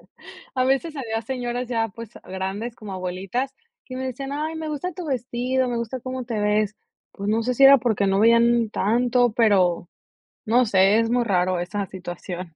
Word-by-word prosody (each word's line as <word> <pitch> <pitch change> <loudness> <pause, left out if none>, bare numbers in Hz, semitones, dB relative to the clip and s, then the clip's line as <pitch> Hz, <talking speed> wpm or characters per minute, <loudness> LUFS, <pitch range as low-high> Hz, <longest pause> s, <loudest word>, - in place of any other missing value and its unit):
e - - -23 0.5
A 255 -1 +1
veces 275 +5 0
había 225 -4 -3
señoras 245 0 -3
ya, 225 -2 0
pues, 225 +2 -10
grandes, 190 +5 -4
como 210 -3 -8
abuelitas, 190 +9 -3 0.3
que 255 - -8
me 260 - -4
decían: 270 +2 -5
"Ay, 305 +3 -3
me 320 -1 -5
gusta 305 +5 -3
tu 345 0 -7
vestido, 255 0 -1
me 240 - -2
gusta 235 +2 -4
cómo 255 +1 -5
te 230 -3 -3
ves". 210 0 +1 0.4
Pues, 200 0 -5
no 225 +2 +1
sé 250 +2 -1
si 275 - +5
era 275 0 +9
porque 220 -4 0
no 195 +1 +2
veían 235 0 +4
tanto, 245 +3 +2
pero 190 -7 +2 0.6
no 240 +3 +4
sé, 195 +1 +4
es 230 0 +1
muy 245 0 +2
raro 185 -3 +1
esa 200 +3 -3
situación. 180 -2 -7
230 Hz, 190 wpm, -23 LUFS, 200-255 Hz, 0.6 s, era